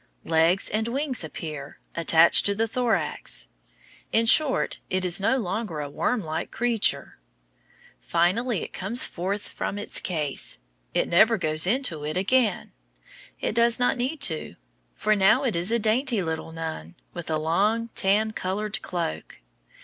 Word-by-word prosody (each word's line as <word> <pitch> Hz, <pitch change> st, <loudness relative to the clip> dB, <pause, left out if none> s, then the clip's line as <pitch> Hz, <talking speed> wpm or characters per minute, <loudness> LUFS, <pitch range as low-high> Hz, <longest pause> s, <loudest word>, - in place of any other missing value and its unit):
Legs 165 Hz, +4 st, +3 dB
and 220 Hz, +2 st, -1 dB
wings 265 Hz, -, -1 dB
appear, 150 Hz, -3 st, -7 dB, 0.2 s
attached 165 Hz, 0 st, +5 dB
to 200 Hz, -, 0 dB
the 225 Hz, +2 st, 0 dB
thorax. 240 Hz, 0 st, 0 dB, 0.6 s
In 225 Hz, +1 st, +3 dB
short, 275 Hz, +4 st, +3 dB
it 185 Hz, 0 st, 0 dB
is 180 Hz, +1 st, +2 dB
no 215 Hz, +7 st, +2 dB
longer 195 Hz, -5 st, -3 dB
a 145 Hz, -1 st, -5 dB
wormlike 160 Hz, -4 st, -2 dB
creature. 235 Hz, -3 st, 0 dB, 0.8 s
Finally, 190 Hz, +7 st, 0 dB
it -, -, -9 dB
comes 215 Hz, +7 st, +1 dB
forth 195 Hz, +4 st, -4 dB
from 200 Hz, -, -4 dB
its 205 Hz, -, -1 dB
case. 150 Hz, -6 st, -1 dB, 0.4 s
It -, -, +2 dB
never 220 Hz, +6 st, +4 dB
goes 155 Hz, -2 st, 0 dB
into 205 Hz, -, 0 dB
it 155 Hz, +3 st, -3 dB
again. 225 Hz, +4 st, +1 dB, 0.7 s
It -, -, -1 dB
does 235 Hz, 0 st, +4 dB
not 245 Hz, +1 st, +2 dB
need 270 Hz, +4 st, -3 dB
to, 160 Hz, -, -2 dB, 0.4 s
for 215 Hz, 0 st, +1 dB
now 205 Hz, +7 st, +4 dB
it 245 Hz, -8 st, 0 dB
is 175 Hz, +5 st, +1 dB
a 235 Hz, -, +3 dB
dainty 230 Hz, 0 st, +1 dB
little 160 Hz, 0 st, -4 dB
nun, 160 Hz, -, -6 dB, 0.2 s
with 175 Hz, -2 st, -7 dB
a 155 Hz, -, +1 dB
long, 205 Hz, +9 st, +1 dB
tan 215 Hz, +1 st, +2 dB
colored 210 Hz, +1 st, -3 dB
cloak. 80 Hz, -, -5 dB
200 Hz, 150 wpm, -25 LUFS, 165-230 Hz, 0.8 s, attached